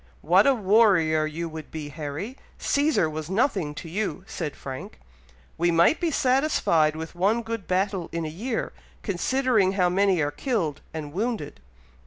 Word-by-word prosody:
"What 185 - +4
a 275 - +5
warrior 190 -8 +4
you 165 +2 -4
would 155 -1 -8
be, 155 -2 -6
Harry! 155 - -5 0.2
Cæsar 285 - +2
was 155 +1 -5
nothing 190 - 0
to 165 - -7
you," 195 +2 -3
said 155 -7 -5
Frank. 130 - -8 0.6
"We 175 +1 +3
might 170 - +4
be 340 - +1
satisfied 255 - +2
with 160 +1 -6
one 205 +7 +1
good 225 -3 -5
battle 190 -1 0
in 165 -1 -3
a - - -2
year, 225 +10 -3 0.3
considering 215 0 +1
how 180 -2 +2
many 190 0 +2
are 145 -1 +1
killed 175 - -2
and 150 -2 -6
wounded." 205 -7 -3
180 Hz, 160 wpm, -25 LUFS, 155-225 Hz, 0.6 s, a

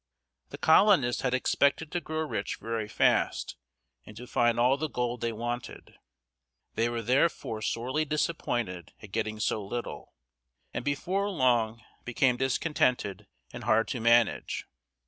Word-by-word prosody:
The - - -8
colonists 160 - +4
had 130 -1 +1
expected 140 +4 +1
to 175 - -2
grow 155 0 -3
rich 155 - -3
very 115 -1 -4
fast, - - +1 0.5
and 105 - -13
to 125 - -8
find 120 -1 +1
all 125 +3 +4
the 155 +2 -3
gold 125 -2 -2
they 115 -1 0
wanted. 120 +2 -5 0.8
They 115 +1 +1
were 120 -1 -3
therefore 125 -2 +1
sorely 125 +8 -1
disappointed 125 - -2
at 105 - -11
getting 110 0 -2
so 110 0 0
little, 120 +4 -6 0.6
and - - -3
before 185 +8 -1
long 120 - +1 0.2
became 125 +1 +2
discontented 125 - 0 0.3
and - - -7
hard 115 - +3
to 125 - -3
manage. 115 0 +2
120 Hz, 140 wpm, -29 LUFS, 115-140 Hz, 0.8 s, colonists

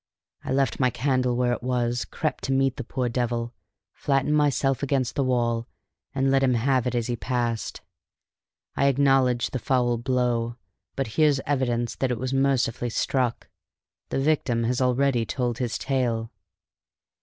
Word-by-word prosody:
I - - -4
left 135 -3 +1
my 130 -2 +3
candle 125 0 0
where 125 0 +1
it - - -4
was, 120 -1 -1
crept 155 - -3
to 135 - -2
meet 135 -1 +1
the 135 - -4
poor 125 +2 -2
devil, 120 -1 -2 0.4
flattened 140 +1 +1
myself 140 -2 +2
against 135 -3 0
the 140 - 0
wall, 120 -2 0 0.5
and 135 0 +2
let 135 0 +3
him 130 -2 +3
have 130 +1 +1
it 125 - -1
as 120 -2 0
he 120 - -1
passed. 120 -2 -2 0.9
I 140 - +3
acknowledge 135 -3 +3
the 130 - -2
foul 120 -2 +1
blow, 120 -2 0 0.4
but 135 - -1 0.2
here's 150 -3 +4
evidence 120 -4 0
that 130 - 0
it 125 - -1
was 130 +3 -3
mercifully 135 -3 +1
struck. 125 +1 -1 0.6
The - - -1
victim 135 -5 +1
has 125 +2 0
already 125 -1 +2
told 120 0 -2
his 120 -3 -1
tale." 120 -4 -1
125 Hz, 160 wpm, -25 LUFS, 120-135 Hz, 0.9 s, here's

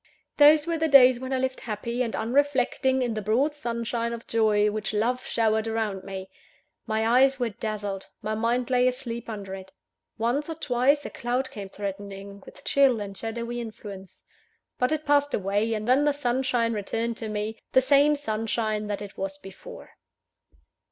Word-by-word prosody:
Those 295 +1 +7
were 335 -1 -1
the 320 - +2
days 255 -4 +7
when 260 +1 -6
I 265 - +1
lived 260 0 -1
happy 235 +2 -4
and 235 -3 -1
unreflecting 265 0 +1
in 240 -2 -1
the 215 - -3
broad 245 +9 +1
sunshine 235 -3 -3
of 235 0 -7
joy 210 -2 +2
which 215 0 -3
love 245 +4 0
showered 220 -1 +1
round 220 -4 -2
me 190 -1 -6 0.6
my 220 0 0
eyes 265 +3 +4
were 240 -2 0
dazzled; 205 -2 -4 0.2
my 215 +1 -1
mind 235 +3 0
lay 250 0 +4
asleep 245 -2 -3
under 200 -3 -6
it. 190 0 -9 0.5
Once 245 +7 0
or 325 - -3
twice, 280 0 +1
a - - -5
cloud 250 +2 -2
came 200 -7 -7
threatening, 200 0 -7
with - - -14
chill 270 -5 +4
and 200 -1 -6
shadowy 235 +3 -4
influence; 205 -5 -9 0.6
but 250 +2 +2
it 310 -1 -1
passed 285 0 +3
away, 205 +3 0
and 215 +1 -4
then 260 +3 +4
the 295 0 +3
sunshine 245 -3 0
returned 225 +3 -2
to 220 - -5
me, 215 +1 -3
the - - +7
same 285 +3 +4
sunshine 215 -4 -2
that 205 0 -3
it 200 - -10
was 195 0 -3
before. 195 -1 -12
230 Hz, 175 wpm, -26 LUFS, 210-260 Hz, 0.6 s, Those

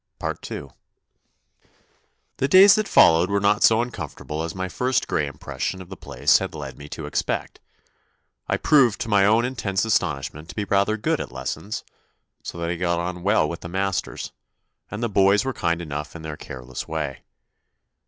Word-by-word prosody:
II 70 - -6 1.7
The 135 - +1
days 190 +6 +8
that 215 -1 +1
followed 85 +3 +5
were 100 0 +1
not 100 +1 +2
so 115 +1 +5
uncom 80 - -6
fortable 75 +1 -5
as 85 +2 -5
my 95 0 -3
first 125 +6 0
grey 75 - 0
impression 80 +6 -4
of 90 -1 -11
the 95 - -7
place - - +2
had - - -5
led - - -7
me 75 0 -11
to - - -6
expect. - - -2 0.9
I - - +1
proved 130 -8 +4
to 115 - -3
my 100 -2 +4
own 115 +3 +4
intense 105 -6 -1
astonishment 75 -6 -1
to - - -9
be 105 - -1
rather 100 +2 +2
good 105 - 0
at - - -7
lessons, 65 - -5 0.6
so - - -7
that 85 0 -2
I 90 - -3
got 85 -1 0
on 90 +1 -4
well 95 -5 +3
with 85 +2 -5
the 85 - -8
masters, 95 +1 -2 0.6
and 105 +3 -5
the - - +2
boys 100 +2 +3
were 130 - -1
kind 85 -4 -1
enough 75 0 -6
in 80 - -8
their 80 -1 -5
care 65 -3 -9
less 65 0 -7
way. 75 -4 -4
95 Hz, 185 wpm, -23 LUFS, 80-110 Hz, 1.7 s, days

